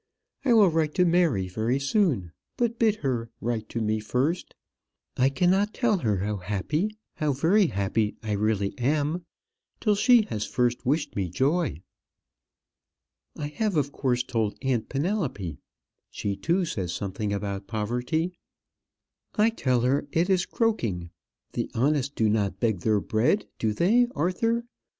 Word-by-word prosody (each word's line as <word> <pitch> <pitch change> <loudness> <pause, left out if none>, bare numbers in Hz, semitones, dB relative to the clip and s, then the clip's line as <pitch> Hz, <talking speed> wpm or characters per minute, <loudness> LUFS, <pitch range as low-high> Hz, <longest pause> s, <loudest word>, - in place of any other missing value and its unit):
I 255 -4 +4
will 210 -5 +7
write 155 -2 0
to 180 - +4
Mary 165 - +2
very 110 +7 0
soon; 140 - +1 0.3
but 235 -2 0
bid 220 -2 +4
her 120 -3 -1
write 115 -2 -3
to 115 - -3
me 110 0 0
first. 130 +10 -1 0.6
I 130 +1 +3
cannot 190 +7 +2
tell 220 -6 +2
her 110 - +1
how 105 +3 -2
happy, 150 - -2 0.2
how 150 -2 +1
very 175 +9 +3
happy 105 -1 0
I 110 - -3
really 105 -1 0
am, 150 +6 0 0.5
till 210 - +2
she 235 +3 +5
has 110 - -3
first 120 +1 0
wished 145 +3 0
me 95 -3 -1
joy. 140 - 0 1.5
I 145 -1 -3
have, 205 +5 -1
of 140 -1 +1
course, 125 -3 0
told 110 -4 -1
aunt 125 -4 0
Penelope. 140 - -2 0.5
She, 100 -1 -3
too, 175 - +1
says 100 - -3
something 100 +3 -3
about 100 -1 -3
poverty. 120 - -1 1.0
I 215 +2 +4
tell 130 - +1
her 135 +4 +1
it 175 +4 +1
is 185 -1 +2
croaking. 110 - -1 0.4
The - - -2
honest 140 +2 +1
do 110 - +2
not 100 -3 0
beg 110 -6 +1
their 105 +3 +2
bread; 115 - +1
do 110 - +1
they, 220 - +3
Arthur? 225 +9 0
130 Hz, 150 wpm, -26 LUFS, 105-180 Hz, 1.5 s, will